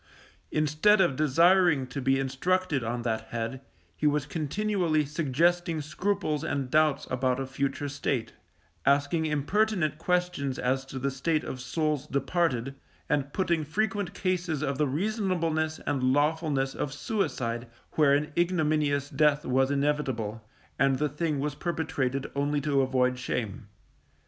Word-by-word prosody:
Instead 155 +8 +3
of 170 -8 +3
desiring 165 +1 +4
to 130 +2 -5
be 135 +1 +2
instructed 145 +3 0
on 120 +1 -3
that 110 -1 -1
head, 120 +3 -4 0.3
he 150 - +1
was 145 -1 +1
continually 165 +1 0
suggesting 165 +3 +1
scruples 155 0 -1
and 135 -3 -2
doubts 155 -2 +3
about 130 0 +1
a 135 - -2
future 135 +2 -2
state, 140 -4 -2 0.5
asking 145 +3 +2
impertinent 155 +1 +1
questions 180 -7 0
as 130 +2 0
to 135 - -7
the 135 +1 -1
state 150 +4 0
of 130 - -6
souls 150 +3 -1
departed, 135 -2 0 0.4
and 145 -1 0
putting 170 -3 0
frequent 200 +3 -1
cases 175 -5 -1
of 140 -2 -2
the 150 - +3
reasonableness 165 - 0
and 140 -3 0
lawfulness 145 +1 +1
of 140 - -3
suicide, 130 - -2 0.2
where 145 -3 +4
an 150 +2 -1
ignominious 155 -5 +1
death 150 +1 +2
was 130 +1 +2
inevitable, 135 -7 -1 0.4
and 135 0 +3
the 150 +1 0
thing 150 0 -1
was 145 +1 -1
perpetrated 145 -4 -2
only 145 +1 0
to 140 -1 +1
avoid 130 -1 +1
shame. 110 -5 -3
145 Hz, 140 wpm, -28 LUFS, 135-165 Hz, 0.5 s, desiring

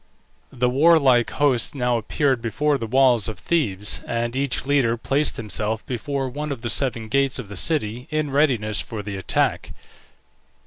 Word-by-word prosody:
The 125 0 0
warlike 135 -3 +4
host 140 -2 +1
now 125 -2 0
appeared 130 +3 0
before 145 +5 0
the 115 - -4
walls 125 -3 +3
of 110 - -6
Thebes, 105 - -1
and 120 +1 -2
each 135 -1 -1
leader 135 -5 +2
placed 140 +5 0
himself 110 0 -2
before 135 +2 -3
one 145 +4 -5
of 135 -5 -5
the 120 - -2
seven 120 -5 0
gates 135 +3 +1
of 120 -6 -7
the 100 - -8
city 125 - -1
in 155 -2 -2
readiness 125 -8 +1
for 110 -2 -7
the 100 -1 -5
attack. 95 - -1
125 Hz, 165 wpm, -22 LUFS, 110-140 Hz, -, warlike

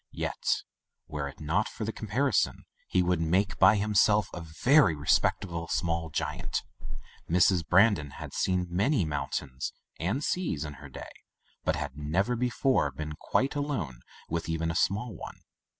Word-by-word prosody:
Yet, - - -1 0.4
were 75 -3 -3
it 70 - -10
not 80 +8 0
for 110 - -5
the 110 - -2
comparison, 115 +3 0 0.2
he 90 - +2
would 90 -1 +1
make, 90 +4 +1
by 95 +3 +7
himself, 105 0 +3
a 85 - -5
very 85 - +4
respectable 85 +3 +1
small 85 -1 -1
giant. - - -2 0.7
Mrs. 90 0 +4
Bran 100 +6 +6
don 75 -6 -5
had - - -9
seen 90 -1 +1
many 100 - +1
mountains 70 -2 -3 0.3
and 105 - -1
seas 115 - -1
in 75 - -6
her 75 - -10
day, - - -9 0.5
but - - +1
had 70 - -5
never 90 +11 0
before 125 - +1
been 75 +3 -6
quite 135 - +1
alone 135 - -3 0.3
with 85 0 -3
even 80 0 0
a - - -5
small 110 +4 +1
one. - - -9
90 Hz, 155 wpm, -29 LUFS, 80-110 Hz, 0.7 s, by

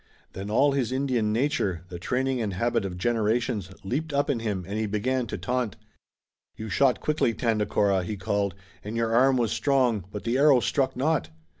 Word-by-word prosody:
Then 95 +2 -6
all 135 +7 +4
his 135 -4 0
Indian 130 -5 0
nature, 105 - 0
the 90 -2 -7
training 130 +6 -1
and 105 -3 -2
habit 115 +2 0
of 90 -2 -5
generations, 110 -1 0
leaped 145 +11 -2
up 140 +1 +2
in 125 - -1
him 105 -5 -3
and 105 +2 -3
he 110 - 0
began 120 +5 -1
to - - -4
taunt. 125 -4 -2 0.8
"You 110 0 -6
shot 125 +6 +3
quickly, 150 -7 0
Tandakora," 105 -4 +1
he 105 +3 -4
called, 100 0 -1 0.3
"and 110 +3 -5
your 115 -1 0
arm 130 +2 +4
was 115 -3 +1
strong, 125 -8 +1
but 105 - -6
the 120 +3 0
arrow 140 -3 +6
struck 135 +2 0
not! 135 - 0
115 Hz, 185 wpm, -26 LUFS, 100-130 Hz, 0.8 s, arrow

